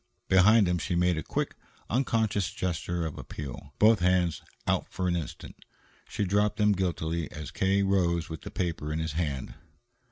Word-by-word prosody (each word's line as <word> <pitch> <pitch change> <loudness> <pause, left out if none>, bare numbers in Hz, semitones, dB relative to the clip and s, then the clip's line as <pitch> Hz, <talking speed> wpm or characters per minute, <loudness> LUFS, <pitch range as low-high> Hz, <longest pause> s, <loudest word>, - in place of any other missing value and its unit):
Behind 95 +3 +6
him 90 0 +1
she 90 +3 -2
made 90 -1 +2
a - - -3
quick, - - -2 0.3
unconscious 110 -5 +1
gesture 85 -1 -2
of 80 - -5
appeal, 70 0 -8
both 110 0 +6
hands 90 -2 +2 0.2
out - - +1
for 90 0 -2
an 85 - +1
instant. 85 -4 -6 0.5
She 100 - -1
dropped 105 +2 +1
them 105 -1 +4
guiltily 85 -4 -1
as 75 -1 -7
K. 95 +1 +2
rose 85 -4 +1
with 80 -2 -7
the - - -7
paper 85 -4 -3
in 75 - -1
his 80 0 -2
hand. 75 -5 -2
90 Hz, 170 wpm, -28 LUFS, 80-100 Hz, 0.5 s, Behind